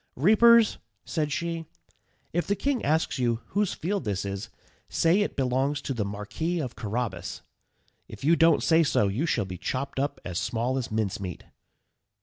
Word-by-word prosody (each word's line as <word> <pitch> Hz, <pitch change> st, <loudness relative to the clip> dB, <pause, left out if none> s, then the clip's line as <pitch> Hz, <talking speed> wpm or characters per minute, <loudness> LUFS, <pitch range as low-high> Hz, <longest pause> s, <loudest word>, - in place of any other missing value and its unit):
"Reapers," 220 Hz, -, +5 dB, 0.3 s
said 150 Hz, -3 st, -1 dB
she, 165 Hz, +1 st, -2 dB, 0.7 s
"if 175 Hz, +1 st, 0 dB
the 200 Hz, -, +2 dB
king 270 Hz, +4 st, -1 dB
asks 155 Hz, -1 st, +1 dB
you 120 Hz, -2 st, +1 dB
whose 205 Hz, 0 st, 0 dB
field 195 Hz, +3 st, -2 dB
this 100 Hz, -4 st, -2 dB
is, 100 Hz, 0 st, -4 dB, 0.4 s
say 170 Hz, +5 st, +3 dB
it 205 Hz, -, -1 dB
belongs 135 Hz, +2 st, 0 dB
to 135 Hz, -, -2 dB
the 115 Hz, -4 st, -1 dB
Marquis 105 Hz, -, -3 dB
of 130 Hz, -6 st, -4 dB
Carrabas; 115 Hz, +1 st, -4 dB, 0.6 s
if -, -, -11 dB
you 160 Hz, +4 st, +5 dB
don't 165 Hz, -1 st, +4 dB
say 165 Hz, 0 st, +5 dB
so, 135 Hz, -9 st, +2 dB
you 125 Hz, -, -1 dB
shall 105 Hz, -, +1 dB
be 90 Hz, -2 st, -7 dB
chopped 135 Hz, +1 st, -3 dB
up 140 Hz, +2 st, -1 dB
as 90 Hz, -2 st, -2 dB
small 125 Hz, +3 st, -1 dB
as 120 Hz, -, -4 dB
mincemeat." 100 Hz, -4 st, -3 dB
135 Hz, 165 wpm, -27 LUFS, 110-170 Hz, 0.7 s, Reapers